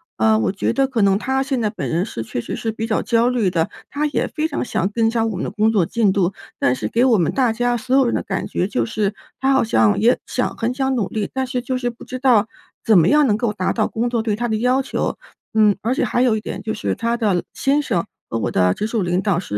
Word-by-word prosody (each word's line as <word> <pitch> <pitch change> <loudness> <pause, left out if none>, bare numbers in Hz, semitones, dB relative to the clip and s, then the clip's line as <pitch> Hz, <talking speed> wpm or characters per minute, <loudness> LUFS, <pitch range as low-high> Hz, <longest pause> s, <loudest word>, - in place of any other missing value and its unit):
呃， 110 0 +3
我 110 - +1
觉 200 - -1
得 270 0 +2
可 250 -4 -1
能 195 -1 +4
她 265 +3 0
现 265 -3 -1
在 215 - +1
本 210 - -5
人 170 +3 0
是 115 - -5
确 115 - -5
实 - - -5
是 225 - -3
比 225 +1 -4
较 215 - 0
焦 235 0 +2
虑 235 -7 +1
的。 165 -2 0 0.2
她 295 +1 -1
也 290 - -1
非 310 0 -2
常 305 - -3
想 190 -3 -1
增 225 -1 +2
加 230 -1 0
我 220 -3 -2
们 - - -3
的 - - -3
工 215 +2 +2
作 195 -6 +2
进 220 +1 +1
度， 190 -1 +1 0.2
但 125 - +2
是 130 - -3
给 235 +2 +1
我 240 -4 +4
们 170 -4 +1
大 255 -4 +2
家 245 +1 0
所 255 +3 -1
有 270 - +4
人 235 - 0
的 - - -1
感 195 - -3
觉 180 - -1
就 120 - -1
是， 205 - -1 0.3
她 265 +1 +3
好 265 - +4
像 110 - +2
也 235 +4 +4
想 250 - -2
很 235 +2 -1
想 265 0 0
努 220 -6 0
力， 215 -2 -3
但 265 0 -1
是 250 -1 -3
就 255 +1 -2
是 245 -1 -1
不 235 - -14
知 255 - -5
道 245 -5 +3 0.4
怎 220 -3 +5
么 165 -1 +5
样 295 -1 +4
能 210 - +3
够 235 -2 0
达 185 -3 -1
到 220 - +1
工 235 +2 -1
作 235 -2 0
对 215 -2 0
她 240 - -1
的 220 - 0
要 250 +4 +2
求。 265 - -3 0.4
嗯， 215 -2 +4
而 235 +4 0
且 - - 0
还 245 - 0
有 245 -4 +3
一 - - -1
点 - - -6
就 220 - -3
是 215 - -2
她 230 +1 -1
的 215 -4 +1
老 175 - 0
先 285 +2 +1
生 175 -11 -1 0.2
和 115 - -2
我 - - -2
的 90 -1 +3
直 - - -2
属 220 0 -1
领 180 +1 0
导 195 -3 +1
是 105 - -4
225 Hz, 310 characters per minute, -20 LUFS, 195-250 Hz, 0.4 s, 怎